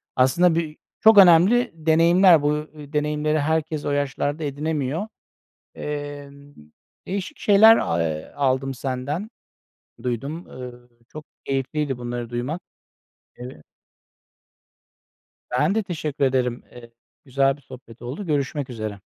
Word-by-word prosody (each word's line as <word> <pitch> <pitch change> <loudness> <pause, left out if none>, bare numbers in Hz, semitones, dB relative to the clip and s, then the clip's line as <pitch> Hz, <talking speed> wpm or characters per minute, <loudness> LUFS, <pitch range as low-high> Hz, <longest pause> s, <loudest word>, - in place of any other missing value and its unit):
Aslında 160 +7 +3
birçok 170 +7 +1
önemli 195 +6 +6
deneyimler, 165 +2 +5
bu 145 0 +1 0.2
deneyimleri 150 +1 -1
herkes 155 0 -1
o - - -1
yaşlarda 145 +2 -2
edinemiyor. 150 +4 -2 0.7
Eee, 145 -1 -6 0.8
değişik 200 +9 -4
şeyler 220 +2 +7
a 85 0 0
eee, 80 -1 -4
aldım 135 -1 0
senden, 135 - -4 0.7
duydum. 135 +8 -4
Eee, 125 -1 -8 0.4
çok 155 0 -10 0.2
keyifliydi 135 0 -2
bunları 120 -1 -5
duymak. 125 +9 -4 0.8
Eee 125 -11 -10 1.9
Ben 130 +11 +1
de 220 - +1
teşekkür 155 -7 -3
ederim. 125 -2 0
Eee, 120 -1 -13 0.3
güzel 135 +1 +1
bir 145 - -22
sohbet 125 -2 -14
oldu. 135 +12 -6
Görüşmek 145 -2 -2
üzere. 110 -4 -6
145 Hz, 110 wpm, -23 LUFS, 130-160 Hz, 1.9 s, şeyler